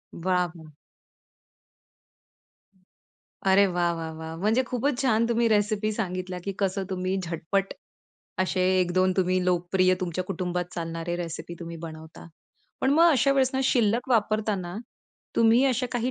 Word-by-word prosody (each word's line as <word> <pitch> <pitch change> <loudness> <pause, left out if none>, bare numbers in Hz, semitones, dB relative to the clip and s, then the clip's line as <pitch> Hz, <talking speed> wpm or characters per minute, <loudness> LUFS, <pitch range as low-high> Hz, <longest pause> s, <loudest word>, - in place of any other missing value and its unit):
वाह! 175 -2 -1 2.8
अरे 195 +1 +5
वाह! 175 -1 +1
वाह! 165 -1 -5
वाह! 160 0 -6
म्हणजे 225 +4 +3
खूपच 260 +2 -1
छान 230 -3 +2
तुम्ही 235 0 +2
रेसिपी 215 0 +1
सांगितल्या 185 -3 -4
की 200 - -3
कसं 195 0 0
तुम्ही 185 0 -2
झटपट 175 +4 -2 0.7
असे 185 - -1 0.2
1-2 185 +1 +2
तुम्ही 185 -1 +1
लोकप्रिय 180 +1 +2
तुमच्या 180 0 -2
कुटुंबात 180 -2 -2
चालणारे 165 0 -4
रेसिपी 170 0 -6
तुम्ही 170 -1 -7
बनवता. 160 0 -10 0.5
पण 265 - +2
मग 335 +4 +6
अशा 275 -1 +3
वेळेस 265 -1 +2
ना, 265 - +1
शिल्लक 235 0 +2
वापरताना 210 -5 0 0.6
तुम्ही 230 +3 +5
अशा 250 +1 -1
काही 245 0 -1
185 Hz, 130 wpm, -26 LUFS, 175-225 Hz, 2.8 s, मग